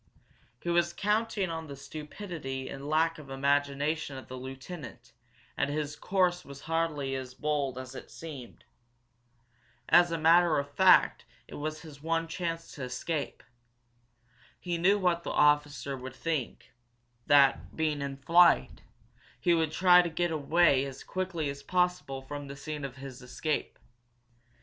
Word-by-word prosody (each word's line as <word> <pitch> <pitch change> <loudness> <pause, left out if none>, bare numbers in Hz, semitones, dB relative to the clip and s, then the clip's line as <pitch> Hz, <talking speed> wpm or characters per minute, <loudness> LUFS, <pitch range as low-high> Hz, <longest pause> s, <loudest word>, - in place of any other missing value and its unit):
He 175 - -4
was 170 0 +2
counting 210 -3 0
on 160 -1 -5
the 140 - -7
stupidity 150 -2 -6
and 140 +1 -7
lack 160 +1 +2
of 145 -3 -12
imagination 145 +2 0
of 130 - -10
the 130 - -7
lieutenant, 130 - -9 0.4
and - - 0
his 150 0 -3
course 180 +1 +1
was 140 0 -11
hardly 160 -4 -1
as 130 -1 -5
bold 145 -4 -1
as 130 0 -7
it - - -9
seemed. 145 -7 -10 1.2
As 175 +1 +6
a 165 - 0
matter 165 +1 +5
of 140 0 -3
fact 190 +2 +5 0.2
it - - -13
was 155 +1 -4
his 145 -3 -12
one 165 +1 0
chance 165 0 -4
to 140 - -7
escape. 140 +4 -4 1.2
He 175 -1 -3
knew 195 +4 +4
what 180 -3 +1
the - - -5
officer 145 -1 +2
would 130 0 -8
think 155 -6 -4 0.5
that, 140 -2 +4
being 155 -2 0
in 140 -1 -4
flight, 170 +6 +4 0.6
he 175 - +3
would 160 -2 +1
try 180 +1 +6
to 175 - -2
get 175 +1 -1
away 155 -2 +3
as 135 -1 -7
quickly 185 -5 -3
as 140 0 -5
possible 180 -5 -1
from 145 +1 -7
the 140 - -7
scene 150 +1 -6
of 135 -2 -5
his 135 -2 -9
escape. 145 +5 -3
150 Hz, 150 wpm, -30 LUFS, 140-170 Hz, 1.2 s, As